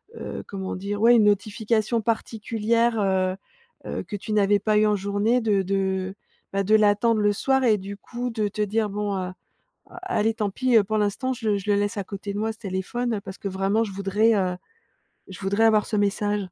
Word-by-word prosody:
heu, - - -6
comment 190 -1 -5
dire? 205 +2 -4
Ouais 235 +1 +7
une 215 -2 +5
notification 215 +2 +1
particulière, 225 +1 0
heu, 190 -1 +1 0.5
heu, - - -4
que 210 - -7
tu 215 +2 -6
n'avais 205 -1 +3
pas 210 +1 +1
eu 215 - +4
en 210 - +2
journée 205 +5 +1
de 205 -3 +2
de, 190 0 -1 0.4
bah 195 0 +1
de 215 +3 +1
l'attendre 215 +1 +3
le 205 0 +3
soir 265 +4 +1
et 215 -3 +4
du 200 +1 -7
coup 245 +4 -5
de 215 -3 -1
te 210 +1 -4
dire: 210 +1 0
«Bon, 205 -1 -2
heu, 185 0 -3 0.7
allez 225 - 0
tant 210 -3 -1
pis, 255 +2 +1
heu, 210 - +6
pour 215 +2 -1
l'instant 210 +6 0
je 230 -3 -4
le 200 - +2
je 200 +2 -9
le 205 - +4
laisse 205 +2 -1
à 200 - -2
côté 200 +1 -6
de 205 - -4
moi 220 +1 -1
ce 220 - -19
téléphone, 210 +3 -3
parce 190 -1 -8
que 200 - -4
vraiment 195 +4 0
je 210 - -3
voudrais, 200 +3 +2
heu, 185 -2 0 0.8
je 185 - -9
voudrais 200 +3 +1
avoir 215 -2 +4
ce 215 - -2
message»? 205 +1 +1
210 Hz, 215 wpm, -24 LUFS, 195-225 Hz, 0.8 s, Ouais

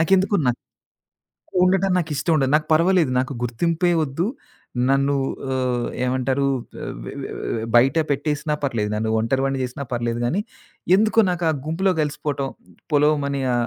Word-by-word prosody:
నాకెందుకోన 185 - +3 1.1
ఉండట 190 +1 +3
నాకు 165 -3 -2
ఇష్టం 155 +4 0
ఉండదు. 135 -1 +1
నాకు 155 - -2
పర్వాలేదు. 170 -2 +3
నాకు 130 +1 -3
గుర్తింపే 165 +9 +1
వద్దు. 150 +6 -2 0.6
నన్ను 140 +1 +2 0.4
ఆహ్, 125 -2 0 0.2
ఏమంటారు 130 +2 0 0.4
ఎ - - -4 0.2
వె - - -6
వె - - -6
వె - - -4
వె 110 - -3
బయట 130 +6 +4
పెట్టేసినా 150 +1 -1
పర్లేదు. 110 -6 -1
నన్ను 110 +1 -1
ఒంటరివాడిని 135 +4 0
చేసినా 135 +3 -5
పర్లేదుగానీ, 120 - -1 0.6
ఎందుకో 220 +2 +3
నాకా 175 -2 0 0.2
గుంపులో 185 +5 +1
కలిసిపోవటం 145 -2 -2 0.4
పొలోమని 145 -2 +2
ఆహ్, 120 -1 +1
140 Hz, 135 wpm, -22 LUFS, 125-165 Hz, 1.1 s, బయట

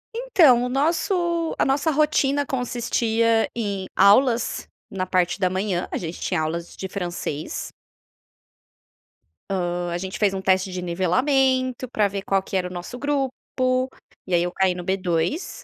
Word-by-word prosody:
Então, 340 - +4
o 250 - -1
nosso 335 +4 0
a - - +2
nossa 285 +4 +1
rotina 285 -1 +2
consistia 230 -3 +1
em 200 -5 -3
aulas 230 +5 +4 0.2
na 185 -1 -3
parte 185 0 +1
da 185 - +2
manhã. 185 -1 -1
A - - -1
gente 170 0 -6
tinha 175 -4 0
aulas 165 +2 -4
de 190 - -5
francês. 175 -5 -4 1.8
Hã. 175 -2 -1
A - - -1
gente 190 +2 -5
fez 205 -2 +2
um 190 - -3
teste 190 0 +2
de 180 0 -4
nivelamento 255 - +1
para 215 -3 +2
ver 195 0 -5
qual 195 -1 +1
que 195 - -6
era 180 -1 -1
o - - -9
nosso 180 +7 -7
grupo, 275 -2 0 0.9
e 185 - -3
aí, 170 - +3
eu 175 - -2
caí 185 -1 +1
no 180 - -6
B2. 185 - -1
200 Hz, 155 wpm, -23 LUFS, 180-265 Hz, 1.8 s, Então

